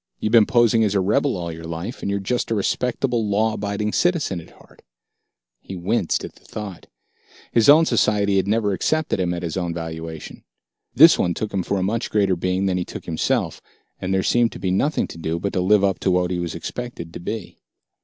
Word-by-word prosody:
You've 110 - -1
been 115 -3 +6
posing 120 -3 +4
as 105 -2 +1
a - - +3
rebel 110 +7 +1
all 85 -1 -4
your 80 0 -9
life, 85 +8 -6
and - - -3
you're 100 0 0
just 120 +6 -2
a 115 - 0
respectable, 120 +2 0
law 110 +2 +1
abiding 105 +1 -2
citizen 160 - +1
at - - -16
heart." - - -21 0.8
He 95 - -9
winced 90 +1 -1
at - - -10
the - - -23
thought. 100 -5 -8 0.6
His 115 +2 +4
own 155 +3 +8
society 105 -6 +2
had 95 0 +1
never 105 -1 +1
accepted 155 +5 0
him 90 -1 0
at 90 0 -4
his 85 +1 -3
own 85 -2 -2
valuation. 80 -1 -7 0.5
This 160 +6 +8
one 85 -1 +1
took 110 -1 -4
him 95 - 0
for 100 - -2
a 95 - -1
much 110 +4 -1
greater 100 -3 +2
being 90 +2 -1
than 95 -1 +1
he - - -1
took - - -9
himself, 80 -2 -1 0.4
and 90 - -3
there 95 0 +1
seemed 120 -1 +2
to - - -9
be 95 - -1
nothing 145 +11 +1
to 85 - -10
do 80 +1 -2
but 100 +4 -3
to 90 - 0
live 100 +2 +4
up 95 -1 +1
to - - 0
what 90 0 +1
he 90 - -1
was 85 -2 -4
expected 85 -2 -6
to - - -7
be. 100 +2 -6
100 Hz, 225 wpm, -22 LUFS, 90-115 Hz, 0.8 s, own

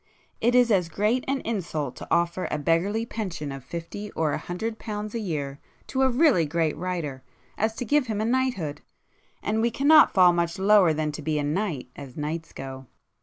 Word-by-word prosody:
It 240 +2 +2
is 245 -2 +5
as 180 -5 +2
great 215 +7 +1
an 275 0 0
insult 165 - -3
to - - -8
offer 170 +2 +1
a - - -1
beggarly 175 +9 +1
pension 180 -11 -4
of 135 -2 -7
fifty 170 +7 -6
or 160 -2 0
a - - -1
hundred 220 +6 -4
pounds 210 -1 -5
a 230 - -2
year 145 -8 -3 0.3
to 265 - -2
a 265 - +5
really 255 - +4
great 160 0 0
writer 165 -7 -4 0.3
as 220 +1 0
to 245 - -4
give 290 +1 +2
him 215 -2 -2
a 215 - 0
knighthood,—and 220 - -3
we 235 - +3
cannot 290 +6 +6
fall 180 -3 +6
much 170 -1 -1
lower 195 -3 +5
than 155 0 -1
to 150 - -7
be 155 +1 -1
a 150 - 0
knight, 150 -3 -2
as 135 -3 -10
knights 160 +2 -4
go. 135 -1 -8
180 Hz, 195 wpm, -26 LUFS, 155-225 Hz, 0.3 s, cannot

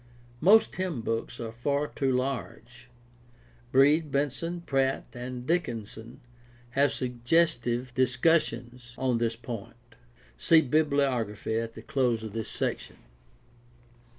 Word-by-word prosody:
Most 205 - +6
hymnbooks 125 -11 -3
are 115 -2 -5
far 140 +5 -1
too 135 -2 -1
large. 125 -2 -4 0.8
Breed, 145 +3 +4
Benson, 145 +5 -2
Pratt, 135 -4 0
and 125 0 -6
Dickinson 115 -9 -3 0.5
have 140 +3 +3
suggestive 125 -1 0
discussions 125 -2 +1
on 125 -3 +1
this 115 -1 0
point 115 -2 -7 0.6
(see 160 - +6
bibliography 130 -7 0
at 115 0 -6
close 125 -6 0
of 110 -2 -7
this 115 -1 -3
section). - - -3
125 Hz, 100 wpm, -28 LUFS, 115-145 Hz, 0.8 s, Most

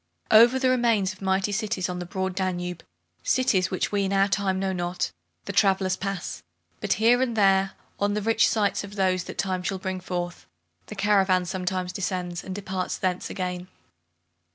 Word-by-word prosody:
Over 235 +4 +7
the 260 -1 +2
remains 230 -6 +2
of 185 - -19
mighty 190 +1 +1
cities 205 -3 -1
on 180 -1 -4
the 175 - -6
broad 190 0 -2
Danube, 180 -2 -3 0.4
cities 190 -8 +2
which 185 - -1
we 200 -1 +1
in 195 - -1
our 195 0 +3
time 195 -1 0
know 190 0 -1
not, 175 0 -2 0.3
the - - -4
travellers 190 -3 +3
pass; 195 -1 -4 0.4
but - - +1
here 235 +4 +4
and 245 -3 0
there, 195 -1 +4 0.3
on 205 0 +1
the 210 - -1
rich 225 +1 +3
sites 205 -3 +1
of 200 0 -9
those 185 -2 +1
that - - -8
time 185 -1 -1
shall 190 +1 -2
bring 190 0 -4
forth, 175 -1 -5 0.4
the - - -8
caravan 195 -3 +3
sometimes 185 0 -2
descends, 180 -3 -3
and 190 - -6
departs 190 -2 -3
thence 185 -1 -2
again. 180 -1 -4
190 Hz, 180 wpm, -26 LUFS, 185-205 Hz, 0.4 s, Over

